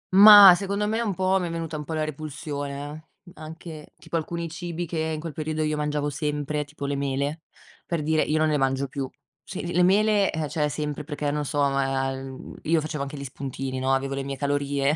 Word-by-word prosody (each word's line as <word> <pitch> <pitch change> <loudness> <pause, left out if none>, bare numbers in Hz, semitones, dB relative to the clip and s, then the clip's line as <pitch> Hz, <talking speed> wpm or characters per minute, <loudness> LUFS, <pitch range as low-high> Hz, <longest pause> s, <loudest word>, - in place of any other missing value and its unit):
Mah, 205 -1 +11
secondo 200 +3 -1
me 220 +2 0
un 210 -5 -1
po' 190 +1 +2
mi 180 - -2
è - - -4
venuta 165 -1 -4
un 150 -1 -5
po' 160 - -5
la 155 - 0
repulsione, 145 0 -5 0.2
eh. 175 - -14
Anche 155 -1 -9
tipo - - -7
alcuni 170 +1 -2
cibi 170 +1 -5
che 165 -1 -4
in 160 -1 -2
quel 165 0 -6
periodo 155 +1 -2
io 155 0 0
mangiavo 150 -1 -1
sempre, 150 0 -2
tipo 145 0 -8
le 140 0 -1
mele, 140 +3 -2 0.5
per 170 -3 -1
dire, 155 +1 +2
io 155 - +1
non 155 0 +2
ne 150 - +2
mangio 135 0 0
più. 135 0 -4 0.3
Sì, 185 - -6
le 175 - -4
le 180 - +3
mele, 205 +2 +4
ehm, 160 -1 -2
cioè, 150 -2 0
sempre 150 0 -4
perché, 145 -1 -3
non 150 0 -2
so, 145 +1 -3
io, 135 -1 -2
ehm, 165 +1 +2
facevo 155 -1 -4
anche 140 +1 -5
gli 140 - -6
spuntini, 135 0 -5
no, 130 +1 0
avevo 135 +1 0
le 135 - -2
mie 135 0 -5
calorie 140 0 0
150 Hz, 220 wpm, -25 LUFS, 140-165 Hz, 0.5 s, Mah